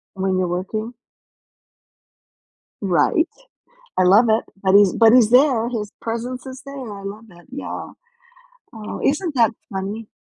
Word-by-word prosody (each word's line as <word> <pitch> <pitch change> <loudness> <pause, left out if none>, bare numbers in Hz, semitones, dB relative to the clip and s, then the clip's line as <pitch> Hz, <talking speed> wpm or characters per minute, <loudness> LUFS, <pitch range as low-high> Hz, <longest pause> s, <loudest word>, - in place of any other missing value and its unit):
When 190 0 -1
you're 185 -1 0
working? 215 +6 -4 1.9
Right. 200 - +2 0.7
I 185 - +4
love 200 +6 +6
it. 220 +1 +3 0.2
But 190 -1 +2
he's 200 -2 +6
but 225 -1 +5
he's 240 -3 +5
there. 250 -3 +4
His 215 -4 -4
presence 240 +3 -5
is 260 0 -9
there. 265 -7 -8
I - - -11
love 210 +3 -8
it, 175 -1 -18
yeah. 280 - -6 0.9
Oh, 215 -1 -7
isn't 300 +2 0
that 235 -2 +4 0.2
funny? 200 +3 -5
220 Hz, 140 wpm, -21 LUFS, 195-250 Hz, 1.9 s, love